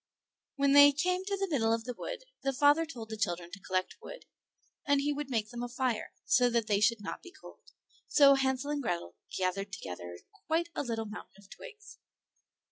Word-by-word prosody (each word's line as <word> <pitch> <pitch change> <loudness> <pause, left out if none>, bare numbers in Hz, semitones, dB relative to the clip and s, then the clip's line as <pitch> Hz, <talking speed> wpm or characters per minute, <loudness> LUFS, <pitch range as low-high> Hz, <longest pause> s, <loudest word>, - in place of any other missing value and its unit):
When 280 0 +2
they 285 0 +9
came 365 +5 0
to 400 0 -2
the 390 0 -1
middle 240 -10 +1
of 225 0 0
the 250 +1 -5
wood - - -6 0.2
the 270 0 -1
father 290 +4 +4
told 235 -8 -8
the 220 - -5
children 175 -4 -2
to 200 - -9
collect 185 -1 -2
wood, - - -10 0.6
and 285 0 +4
he 290 +1 0
would 290 -1 -5
make 220 -4 -1
them 240 0 -6
a 245 - -4
fire, 245 -3 -2
so 245 0 +4
that 235 -2 +1
they 205 -2 +1
should 215 +1 +2
not 200 - -6
be 360 - -12
cold; - - -15 0.4
so 280 -2 +7
Hansel 270 +1 0
and 295 -1 -1
Grethel 170 - -3 0.2
gathered 190 +2 -1
together 85 - -7 0.3
quite 335 +2 0
a - - -2
little 230 -4 -3
mountain 210 0 -10
of 200 -1 -19
twigs. 430 -4 -12
250 Hz, 205 wpm, -31 LUFS, 210-290 Hz, 0.6 s, they